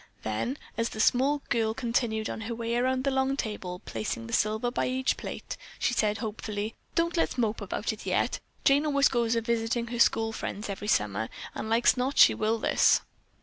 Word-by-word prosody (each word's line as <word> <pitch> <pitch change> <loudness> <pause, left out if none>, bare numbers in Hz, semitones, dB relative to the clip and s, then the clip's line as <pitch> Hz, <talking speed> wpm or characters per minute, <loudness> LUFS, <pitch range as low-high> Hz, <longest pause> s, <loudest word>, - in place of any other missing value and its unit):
Then 110 - -2 0.2
as 230 - +1
the 220 - -8
small 275 +5 +3
girl 225 -2 +1
continued 230 -3 0
on - - -5
her 230 +1 -4
way 230 0 -2
around 255 +1 +1
the 275 - +1
long 265 +1 +1
table 185 -7 -4
placing 115 +1 -4
the 115 - -8
silver 220 +3 +1
by - - 0
each 260 +1 0
plate, - - -6 0.2
she - - +1
said 210 -2 +1
hopefully, 215 0 -4 0.2
"Don't 335 +1 +1
let's 330 - +1
mope 225 -2 0
about - - -2
it - - -10
yet. - - 0 0.2
Jane 285 +2 +4
always 280 -1 +4
goes 235 -2 +1
a 230 - +1
visitin' 235 0 -1
her 240 0 -4
school 225 -1 +3
friends 210 -1 -5
every 200 +1 -5
summer 105 - +1 0.2
and 220 - -5
like's 230 +3 +4
not 260 +3 -1
she - - +8
will 220 +1 0
this." - - +4
230 Hz, 195 wpm, -28 LUFS, 215-255 Hz, 0.2 s, she